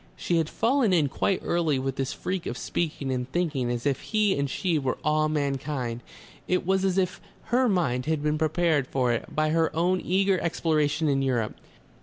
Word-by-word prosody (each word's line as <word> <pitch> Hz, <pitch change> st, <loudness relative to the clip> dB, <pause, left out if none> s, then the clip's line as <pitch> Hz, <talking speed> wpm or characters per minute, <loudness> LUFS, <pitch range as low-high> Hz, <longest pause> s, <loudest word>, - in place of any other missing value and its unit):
She 175 Hz, -, 0 dB
had 160 Hz, -1 st, 0 dB
fallen 235 Hz, -4 st, +2 dB
in 155 Hz, -5 st, +3 dB
quite 190 Hz, +7 st, 0 dB
early 165 Hz, -5 st, +1 dB
with 135 Hz, 0 st, -2 dB
this 135 Hz, -1 st, -2 dB
freak 185 Hz, -1 st, -4 dB
of -, -, -4 dB
speaking 150 Hz, -5 st, -2 dB
and 125 Hz, 0 st, -3 dB
thinking 150 Hz, -8 st, 0 dB
as 120 Hz, +1 st, -3 dB
if 140 Hz, -2 st, 0 dB
he 215 Hz, -3 st, +1 dB
and 140 Hz, 0 st, -1 dB
she 165 Hz, +3 st, 0 dB
were 130 Hz, -2 st, -1 dB
all 155 Hz, +1 st, +2 dB
mankind. 140 Hz, -5 st, -2 dB, 0.5 s
It 180 Hz, 0 st, +1 dB
was 190 Hz, +1 st, +2 dB
as 190 Hz, -1 st, +1 dB
if 185 Hz, -1 st, 0 dB, 0.3 s
her 250 Hz, 0 st, +4 dB
mind 145 Hz, -, 0 dB
had 155 Hz, -2 st, 0 dB
been 150 Hz, 0 st, 0 dB
prepared 160 Hz, -3 st, +1 dB
for 125 Hz, -3 st, +1 dB
it 115 Hz, -, -5 dB
by 155 Hz, 0 st, +2 dB
her 165 Hz, 0 st, +2 dB
own 180 Hz, +3 st, +1 dB
eager 190 Hz, +1 st, +2 dB
exploration 155 Hz, -2 st, +1 dB
in 135 Hz, -1 st, +2 dB
Europe. 125 Hz, -5 st, 0 dB
155 Hz, 195 wpm, -26 LUFS, 135-180 Hz, 0.5 s, her